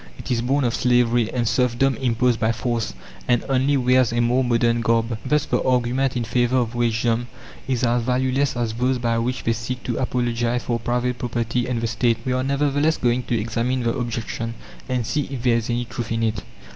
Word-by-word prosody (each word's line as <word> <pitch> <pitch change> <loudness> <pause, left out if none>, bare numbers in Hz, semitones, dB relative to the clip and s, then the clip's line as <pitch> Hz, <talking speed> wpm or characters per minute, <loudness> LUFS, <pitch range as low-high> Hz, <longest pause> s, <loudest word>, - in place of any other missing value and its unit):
It - - -6
is 120 -2 +1
born 135 +4 +1
of 120 -2 +1
slavery 120 -2 +2
and 120 -2 -1
serfdom 125 +3 +2
imposed 125 -1 +1
by 110 0 +2
force, 115 - -2 0.3
and 120 -2 +2
only 135 +1 +2
wears 125 -2 +3
a 120 - 0
more 120 +2 +2
modern 120 -1 +2
garb. 115 +1 +1
Thus 150 +2 +1
the - - 0
argument 130 +1 +1
in 120 - -1
favour 120 +2 +1
of 120 -2 0
wagedom 120 0 0 0.4
is 130 -2 -1
as 120 0 +2
valueless 130 +2 0
as 115 -2 -1
those 125 +3 +1
by 115 -1 0
which 125 +2 -2
they 115 - +1
seek 115 +3 -5
to 120 - -2
apologize 120 -1 0
for 120 -1 -1
private 125 +1 -1
property 120 0 -1
and 125 -2 -1
the - - -1
State. 115 +1 +1
We 130 - 0
are, 130 - 0
nevertheless, 145 +3 +1
going 120 0 +1
to 115 - 0
examine 115 +3 -1
the 115 0 +1
objection, 115 -2 -3 0.3
and 125 -2 0
see 145 +5 -1
if 130 -4 -5
there 120 -2 +3
is 115 0 -3
any 120 +1 -1
truth 120 -1 -6
in 115 0 0
it. 110 -2 0
120 Hz, 210 wpm, -22 LUFS, 115-130 Hz, 0.4 s, wears